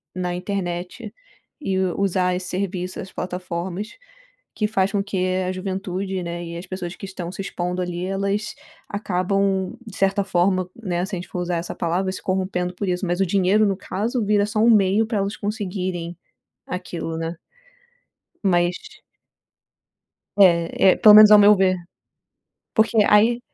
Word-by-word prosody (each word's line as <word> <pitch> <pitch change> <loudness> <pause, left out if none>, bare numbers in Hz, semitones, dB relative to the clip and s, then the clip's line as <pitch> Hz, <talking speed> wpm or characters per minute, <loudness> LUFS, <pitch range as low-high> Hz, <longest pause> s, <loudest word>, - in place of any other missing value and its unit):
na 180 -1 -2
internet 180 -1 -4 0.5
e 195 -9 -1
usar 185 0 0
esse 185 0 -4
serviço, 185 -1 -3
as 185 - -10
plataformas 180 +2 -5 0.6
que 210 - 0
faz 195 -2 0
com 200 - 0
que 200 -1 -4 0.3
a - - 0
juventude, 190 0 -4
né, 170 0 -5
e 170 0 -7
as 175 - -7
pessoas 180 -2 -5
que - - -8
estão 185 -3 -6
se 195 - -6
expondo 180 -2 -3
ali, 175 0 -3
elas 200 +2 -2 0.4
acabam, 195 -1 0
de 210 - -9
certa 195 +1 +2
forma, 185 0 +1
né, 180 -5 -2
se 190 - -5
a - - -4
gente 175 - -8
for 180 - -4
usar 175 0 -2
essa 170 +1 -4
palavra, 180 +3 -1
se - - -7
corrompendo 185 -1 -2
por 200 - -3
isso. 180 +2 -1
Mas 175 +1 -1
o - - +4
dinheiro, 195 +3 +3
no 195 -2 0
caso, 220 +5 -2
vira 205 0 +3
só 215 +1 -2
um 225 +2 +5
meio 210 0 +4
pra 220 -2 -1
elas 200 +1 -2
conseguirem 185 -5 -4 0.5
aquilo, 170 -3 -5
né? 165 +1 -4 1.1
Mas 175 -1 +2 1.6
É, 180 -1 +5
é, - - -9
pelo 210 -1 +8
menos, 215 0 +10
ao 210 - +9
meu 205 +1 +7
ver. 185 -1 +3 1.0
Porque 220 0 +2
aí 225 +3 +4
190 Hz, 165 wpm, -22 LUFS, 180-200 Hz, 1.6 s, menos